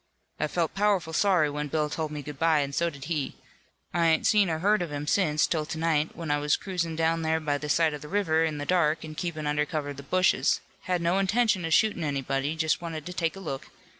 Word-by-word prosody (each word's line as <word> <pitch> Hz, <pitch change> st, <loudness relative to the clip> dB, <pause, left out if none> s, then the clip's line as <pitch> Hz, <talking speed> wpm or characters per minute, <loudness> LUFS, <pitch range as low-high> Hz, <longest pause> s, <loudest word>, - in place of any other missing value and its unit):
"I -, -, +1 dB
felt 165 Hz, 0 st, -1 dB
powerful 195 Hz, -5 st, +1 dB
sorry 180 Hz, -4 st, +3 dB
when 150 Hz, 0 st, -3 dB
Bill 150 Hz, +1 st, 0 dB
told 155 Hz, +1 st, -3 dB
me 150 Hz, -1 st, -6 dB
good 145 Hz, -1 st, -8 dB
bye, 160 Hz, -2 st, +3 dB
and 140 Hz, 0 st, -3 dB
so 170 Hz, +4 st, +1 dB
did 140 Hz, -4 st, -11 dB
he. 150 Hz, -4 st, -2 dB, 0.6 s
I 170 Hz, 0 st, +3 dB
ain't 160 Hz, -1 st, +2 dB
seen 205 Hz, -4 st, +4 dB
or 160 Hz, -, 0 dB
heard 205 Hz, +4 st, +2 dB
of 170 Hz, -3 st, -3 dB
him 145 Hz, 0 st, -4 dB
since 150 Hz, -2 st, +2 dB
'till 155 Hz, -2 st, -1 dB
to 160 Hz, -, -4 dB
night, 160 Hz, -1 st, 0 dB
when 165 Hz, -3 st, -4 dB
I 145 Hz, -, +2 dB
was 145 Hz, 0 st, +2 dB
cruisin' 175 Hz, -4 st, -3 dB
down 165 Hz, +1 st, +1 dB
there 160 Hz, 0 st, +1 dB
by 145 Hz, -2 st, -1 dB
the 150 Hz, -, -5 dB
side 160 Hz, 0 st, +3 dB
of 150 Hz, -, -6 dB
the 150 Hz, -, -9 dB
river 165 Hz, -4 st, +1 dB
in 155 Hz, -2 st, -1 dB
the 145 Hz, -, -4 dB
dark 165 Hz, -3 st, +1 dB
an' 155 Hz, -, -8 dB
keepin' 155 Hz, -1 st, -4 dB
under 150 Hz, 0 st, +1 dB
cover 150 Hz, -1 st, -3 dB
of 140 Hz, -, -7 dB
the -, -, -7 dB
bushes. 185 Hz, +7 st, +2 dB, 0.3 s
Had 180 Hz, -2 st, 0 dB
no 175 Hz, +3 st, +2 dB
intention 205 Hz, -2 st, +2 dB
of 165 Hz, -, 0 dB
shootin' 215 Hz, -6 st, +2 dB
anybody. 140 Hz, 0 st, -1 dB
Just 160 Hz, 0 st, 0 dB
wanted 160 Hz, -3 st, -5 dB
to 180 Hz, -, -6 dB
take 165 Hz, -1 st, -1 dB
a -, -, -8 dB
look. 135 Hz, -8 st, -5 dB
160 Hz, 255 wpm, -27 LUFS, 150-175 Hz, 0.6 s, seen